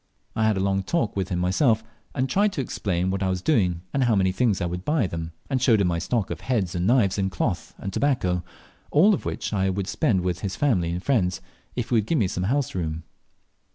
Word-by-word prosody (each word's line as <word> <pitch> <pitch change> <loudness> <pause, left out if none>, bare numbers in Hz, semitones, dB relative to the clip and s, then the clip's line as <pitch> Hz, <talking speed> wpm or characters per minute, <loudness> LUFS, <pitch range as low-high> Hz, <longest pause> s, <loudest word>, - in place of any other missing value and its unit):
I 110 -1 +2
had 110 -2 +2
a - - 0
long 95 0 +1
talk 115 - -1
with 95 -2 -2
him 90 - -1
myself, 110 - +2 0.3
and 130 -1 +1
tried 200 +6 +2
to 140 - -1
explain 95 -7 -1
what 95 0 -2
I 95 - +1
was 90 -1 -2
doing, 90 - +2
and 135 -2 +2
how 115 -3 +3
many 95 -1 +2
things 105 -1 +1
I - - -1
would 90 +1 -4
buy 150 0 +1
of 95 - -2
them, 80 0 -4 0.2
and 130 -3 -1
showed 115 -4 +4
him 95 -3 +2
my 85 -1 0
stock 105 +4 -1
of - - -5
heads, 105 -9 -1
and 90 0 -1
knives, 110 -5 +3
and 95 0 +1
cloth, 85 -1 -3
and 95 - -6
tobacco, 95 -12 +1 0.5
all 190 +9 +5
of - - -3
which - - -3
I 95 -1 +1
would 95 0 -2
spend 105 - +1
with 90 -1 -1
his 95 -2 -3
family 100 -13 +1
and 90 +2 -3
friends 95 -9 +1 0.4
if 120 -3 -3
he - - -1
would 110 -2 +2
give 165 - +1
me 105 -8 +2
house 115 +10 -1
room. 80 -3 -3
95 Hz, 245 wpm, -25 LUFS, 90-125 Hz, 0.5 s, all